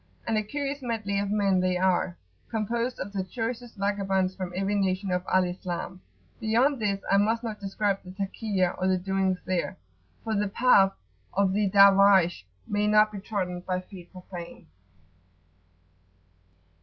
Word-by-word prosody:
And 225 - 0
a 215 - +2
curious 280 +5 -4
medley 215 -5 -2
of 200 0 -2
men 200 -2 +2
they 180 0 +1
are, 185 -1 +1 0.3
composed 235 +3 -2
of 200 +2 -5
the 195 -2 -1
choicest 230 +3 -5
vagabonds 195 -2 0
from 185 -2 -5
every 195 +2 -1
nation 195 -1 0
of 180 0 0
Al 185 0 +4
Islam. 180 0 -5 0.4
Beyond 245 +5 +2
this 200 -2 -1
I 195 - +5
must 225 +3 +1
not 220 -3 -5
describe 200 0 -1
the 180 - -11
Takiyah 195 -1 -2
or 185 - +2
the 185 0 +3
doings 190 0 0
there, 185 -1 -2 0.5
for 225 - -2
the 205 0 +1
"path" 195 -3 +4 0.4
of 195 -1 +2
the 205 0 +1
Darwaysh 195 - +5 0.2
may 205 0 0
not 215 0 +5
be 205 - -6
trodden 185 -3 -3
by 180 +1 -2
feet 185 -1 -12
profane. 180 -2 -10
195 Hz, 155 wpm, -27 LUFS, 185-215 Hz, 0.5 s, I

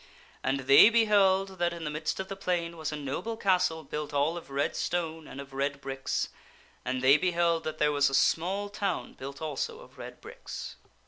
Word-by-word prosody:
And 135 0 0
they 140 - +8
beheld 195 -4 +3
that 175 0 +1
in 170 -1 -7
the 150 - -3
midst 155 +4 -3
of 190 - -3
the 195 - -5
plain 175 -3 -2
was 155 -1 -4
a - - -3
noble 150 +11 -4
castle 180 -6 +1
built 150 -1 -5
all 145 +4 +2
of 175 - -8
red 140 +1 -1
stone 165 -2 -2
and 140 - -9
of 140 -1 -9
red 140 +1 -1
bricks; 135 -1 -2 0.5
and 130 0 -2
they 135 +3 +7
beheld 170 -1 +1
that 155 0 -3
there 150 -1 +3
was 145 -1 +3
a 135 - 0
small 190 +8 +2
town 200 -3 -3
built 140 +3 -8
also 455 - -3
of - - -16
red - - -9
bricks. - - -8
160 Hz, 200 wpm, -29 LUFS, 140-190 Hz, 0.5 s, they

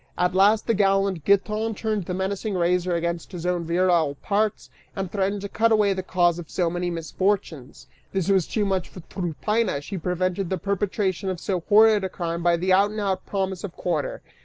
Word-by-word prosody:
At 180 0 +1
last 205 +3 +4
the 230 - +2
gallant 195 -4 +1
Giton 215 +2 +1
turned 215 -3 -2
the 180 - -3
menacing 195 +2 -2
razor 180 0 +1
against 170 +1 -3
his 175 -1 -6
own 180 -1 0
virile 170 -3 +2
parts, 210 +7 -1 0.2
and 195 -2 -4
threatened 200 0 -1
to 200 - -4
cut 225 +3 +1
away 210 -2 +4
the 190 - -3
cause 175 -2 +1
of 170 - -9
so 175 -2 0
many 175 0 -2
misfortunes. 170 -4 -2 0.3
This 190 -3 -1
was 190 -4 +2
too 210 -2 0
much 190 -2 -1
for 180 - -11
Tryphaena; 185 +2 -1
she 185 +6 -6
prevented 180 +2 -1
the 190 - -1
perpetration 195 0 -1
of 185 -2 -3
so 185 -1 -1
horrid 215 -1 +6
a 190 - -1
crime 170 -2 -4
by 170 0 +3
the 185 +2 +1
out 200 +2 +4
and 215 +1 -5
out 190 -2 -2
promise 190 -2 -2
of 195 -4 -5
quarter. 165 -5 -2
190 Hz, 200 wpm, -24 LUFS, 175-200 Hz, 0.3 s, horrid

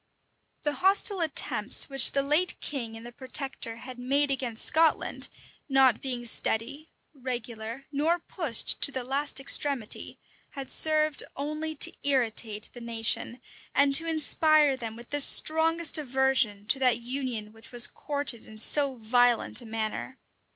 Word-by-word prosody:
The 295 - -1
hostile 390 0 +3
attempts 315 -3 +1
which 270 -1 +3
the 275 - +1
late 305 +6 +1
king 235 -6 -5
and 225 - -12
the 240 - -9
protector 260 -2 -4
had 250 +2 -11
made 275 +3 +1
against 245 -4 0
Scotland, 320 0 +1 0.4
not 265 -4 +3
being 250 -3 -4
steady, 240 +6 -2 0.2
regular, 240 -2 -7
nor 305 +4 0
pushed 320 -8 0
to - - +5
the 260 -2 -4
last 275 +3 +1
extremity, 270 -4 -1 0.4
had 275 -2 -7
served 310 -1 +2
only 305 +2 -5
to - - +2
imitate 225 -6 0
the 245 - -11
nation, 235 +1 -1 0.4
and 280 0 +4
to 325 +4 +4
inspire 310 -2 +2
them 230 -3 -7
with 235 +3 -14
the 290 - -1
strongest 320 +3 +3
aversion 260 -7 0
to 265 +5 +1
that 250 -3 +2
union 240 -4 -5
which 225 +2 -14
was 240 -1 +5
courted 285 -5 -3
in 220 - -13
so 275 +4 +2
violent 245 +2 +1
a 235 - -12
manner. 220 +4 -5
265 Hz, 145 wpm, -27 LUFS, 235-290 Hz, 0.4 s, to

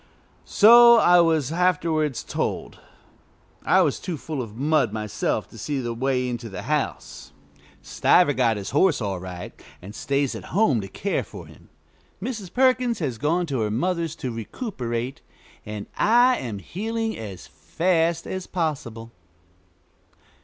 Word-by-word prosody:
So 235 +2 +7
I 180 -6 +5
was 160 -4 +1
afterwards 160 -5 0
told. - - -4 0.8
I - - +4
was - - -1
too 175 -4 -5
full 140 +2 -5
of 110 -3 -8
mud 145 -4 +1
myself 105 -1 -2
to - - -12
see 145 -2 -3
the 120 -2 -3
way 125 +1 -1
into 120 -2 -5
the 95 -1 -7
house. 135 - -3 0.5
Stiver 145 - +3
got 120 -4 +1
his 100 -1 -6
horse 150 +2 +3
all 100 -5 -3
right, 90 -1 -8 0.3
and 95 +3 -11
stays 140 +2 -1
at - - -8
home 150 - +3
to 95 - -7
care - - -2
for - - -11
him. - - -18 0.5
Mrs. 210 -3 -5
Perkins 255 -2 +2
has 130 - -3
gone 165 +5 +1
to 140 -6 -3
her 110 -1 0
mother's 165 - -1
to 130 -6 -5
recuperate, 120 - -5 0.5
and 105 -1 -6
I 245 +3 +4
am 115 -6 -5
healing 225 - -4
as 100 -5 -8
fast 170 -1 -1
as 185 -1 -5
possible. 135 -10 -4
145 Hz, 145 wpm, -24 LUFS, 115-180 Hz, 0.8 s, So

